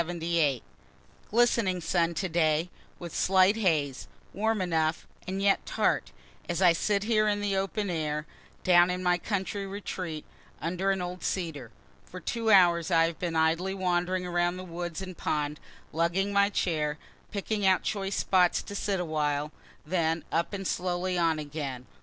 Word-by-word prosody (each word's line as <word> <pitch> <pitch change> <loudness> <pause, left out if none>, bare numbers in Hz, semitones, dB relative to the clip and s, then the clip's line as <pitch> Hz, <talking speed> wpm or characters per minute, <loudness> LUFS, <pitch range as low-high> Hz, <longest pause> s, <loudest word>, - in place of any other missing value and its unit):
Glistening 225 -5 +2
sun 170 0 0
today, 165 -1 +1 0.3
with 170 -2 -8
slight 190 +2 +4
haze, 155 -11 0 0.3
warm 220 +2 0
enough, 160 -3 0 0.2
and 190 +1 -3
yet 200 -1 +3
tart, 65 - 0 0.4
as 175 - -1
I 180 -3 +6
sit 200 +4 0
here 215 -1 +2
in 205 -1 +1
the 205 -1 -1
open 195 +2 -1
air, 150 -2 -2 0.4
down 175 -1 +6
in 180 0 -2
my 180 0 +2
country 200 +1 -3
retreat, 185 -5 -5 0.3
under 180 +4 -1
an 190 -2 0
old 180 +1 -6
cedar. 160 -10 -3 0.3
For 185 - -10
two 230 +3 -2
hours 175 -4 +5
I 165 -2 +4
have 165 -1 -4
been 170 -2 -2
idly 165 +4 +1
wandering 180 0 0
around 175 0 0
the 185 - -6
woods 175 0 -5
and 185 -1 -7
pond, 150 -1 -2 0.3
lugging 175 +5 +1
my 200 0 +4
chair, 155 -6 -1 0.3
picking 205 +1 -2
out 185 -1 +3
choice 195 -2 -2
spots 180 -2 +2
to - - -8
sit 200 -1 -1
awhile 150 -3 -1 0.3
then 165 -1 0
up 170 +1 0
and 195 -1 -5
slowly 180 0 -1
on 165 -2 +2
again. 145 -4 -5
180 Hz, 155 wpm, -28 LUFS, 165-195 Hz, 0.4 s, I